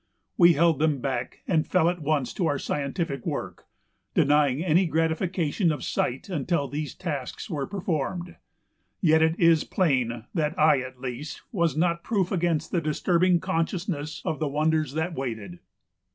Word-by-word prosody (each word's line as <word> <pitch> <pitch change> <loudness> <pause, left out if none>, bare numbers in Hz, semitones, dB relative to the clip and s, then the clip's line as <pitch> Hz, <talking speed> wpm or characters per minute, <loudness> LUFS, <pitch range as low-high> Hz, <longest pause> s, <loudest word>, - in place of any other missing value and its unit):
We 170 -1 +7
held 165 -1 +3
them 155 -3 +2
back 125 -2 -4
and 160 -4 +1
fell 185 -3 +3
at 175 0 0
once 145 -3 0
to 175 - 0
our 145 - +1
scientific 140 0 -3
work, - - -5 0.5
denying 145 0 +3
any 175 +2 +3
gratification 165 +2 0
of 145 -4 -4
sight 125 +2 -2
until 165 -4 -1
these 145 +3 -4
tasks 145 -8 -5
were 145 -4 -2
performed, 175 -2 -3 0.6
yet 160 -2 +4
it 160 +2 +2
is 165 -2 +5
plain 130 - 0
that 155 -2 -1
I 150 -2 +5
at 130 0 -7
least 130 +3 -6
was 170 - 0
not 170 0 +1
proof 195 -6 0
against 170 -4 0
the 175 - +1
disturbing 175 +3 +2
consciousness 165 -3 -2
of 160 -4 -2
the 155 - 0
wonders 155 0 0
that 160 +2 -1
waited. 110 - -5
160 Hz, 155 wpm, -26 LUFS, 140-170 Hz, 0.6 s, We